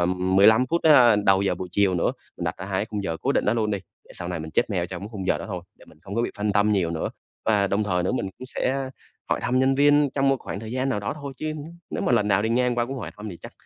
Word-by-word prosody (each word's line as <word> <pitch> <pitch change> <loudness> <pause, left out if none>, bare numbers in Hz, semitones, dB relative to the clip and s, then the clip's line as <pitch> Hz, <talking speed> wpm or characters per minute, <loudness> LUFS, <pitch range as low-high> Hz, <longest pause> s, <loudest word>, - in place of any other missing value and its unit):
ừm, 90 +1 +1
15 110 +6 +6
phút, 170 +4 -1
a, 125 -8 +7
đầu 100 -1 +3
giờ 100 - +1
buổi 90 - -6
chiều 100 -2 +3
nữa, 85 - +1 0.3
mình - - -5
đặt - - -2
ra 95 - -6
hai 95 -1 -1
cái - - -1
khung 105 -2 -3
giờ 80 -4 -2
cố - - +1
định - - +1
đó 105 - +2
luôn 110 -2 0
đi, 100 - -1 0.3
để - - -22
sau 85 - -3
này 90 -2 -3
mình 80 0 -7
check 115 - +1
mail 90 -4 0
trong 90 -1 -6
cái 100 - -6
khung 95 -3 -5
giờ - - +2
đó - - -6
thôi, 90 -4 -5 0.2
để - - -16
mình - - -19
không 100 +1 -7
có 115 - +1
bị - - -1
phân 105 0 0
tâm 105 +1 +3
nhiều 90 -5 +1
nữa 80 -1 -2 0.4
và 105 -3 +3
đồng 100 +2 0
thời 90 -3 0
nữa 90 - 0
mình 130 - -1
cũng 130 - -8
sẽ 130 +1 -2 0.4
hỏi - - 0
thăm 125 +1 +1
nhân 130 +1 +3
viên 145 +1 +4
trong 135 -1 +2
một 135 - +3
khoảng 100 - -6
thời 110 0 -7
gian 130 +1 -1
nào 125 -6 -1
đó 100 - -2
thôi, 140 -2 -7
chứ 155 +2 -3 0.4
nếu - - -3
mà - - +1
lần 105 -3 +3
nào 100 0 +3
đi 110 - 0
ngang 125 +1 +2
qua 120 0 0
cũng 135 +2 -5
hỏi 110 - -6
thăm 105 +1 -7
thì 90 - -8
chắc - - -10
105 Hz, 325 wpm, -24 LUFS, 95-125 Hz, 0.4 s, a